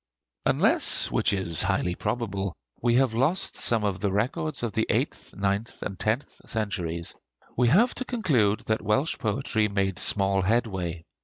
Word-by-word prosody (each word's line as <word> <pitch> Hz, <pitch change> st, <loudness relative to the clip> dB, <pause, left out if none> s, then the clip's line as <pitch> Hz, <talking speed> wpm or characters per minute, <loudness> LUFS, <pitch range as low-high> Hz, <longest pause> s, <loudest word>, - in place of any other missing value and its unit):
Unless, -, -, +3 dB
which -, -, +2 dB
is 95 Hz, -5 st, +1 dB
highly 90 Hz, -, 0 dB
probable, 100 Hz, -3 st, -3 dB, 0.3 s
we 120 Hz, 0 st, +3 dB
have 130 Hz, -2 st, +3 dB
lost 135 Hz, +11 st, 0 dB
some 115 Hz, -2 st, +1 dB
of 100 Hz, -3 st, -1 dB
the 100 Hz, 0 st, 0 dB
records 125 Hz, +7 st, -1 dB
of 115 Hz, -, -2 dB
the 110 Hz, -, 0 dB
eighth, -, -, -2 dB
ninth, 100 Hz, +3 st, -2 dB
and 95 Hz, -2 st, -5 dB
tenth 115 Hz, +6 st, -2 dB
centuries, 90 Hz, -7 st, -2 dB, 0.4 s
we 125 Hz, 0 st, +3 dB
have 215 Hz, -, +4 dB
to 255 Hz, -, -3 dB
conclude 135 Hz, -, +1 dB
that 110 Hz, 0 st, -1 dB
Welsh 135 Hz, +9 st, 0 dB
poetry 110 Hz, 0 st, 0 dB
made 95 Hz, -2 st, -1 dB
small 95 Hz, -1 st, +1 dB
headway. 95 Hz, -5 st, -1 dB
105 Hz, 155 wpm, -26 LUFS, 95-120 Hz, 0.4 s, have